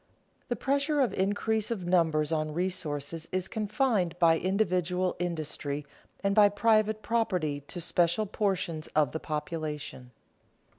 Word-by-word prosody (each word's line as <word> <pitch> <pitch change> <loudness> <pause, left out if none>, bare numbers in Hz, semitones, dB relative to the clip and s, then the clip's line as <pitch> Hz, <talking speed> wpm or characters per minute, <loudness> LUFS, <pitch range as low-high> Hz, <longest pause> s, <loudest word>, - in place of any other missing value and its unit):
_The 240 - -1
pressure 280 +4 +1
of 260 -4 +2
increase 205 +3 0
of 205 -7 -3
numbers 165 -4 +2
on 155 -1 -1
resources 165 -3 -2
is 185 0 -1
confined 210 -5 0
by 165 -2 +4
individual 185 -2 0
industry 150 -4 -3 0.4
and 200 0 +2
by 205 -1 +7
private 215 +1 +2
property 180 -11 0
to 175 - -5
special 175 +4 +2
portions 190 -6 -1
of 150 -4 +3
the 160 - -3
population. 150 -4 -4
180 Hz, 130 wpm, -29 LUFS, 160-210 Hz, 0.4 s, by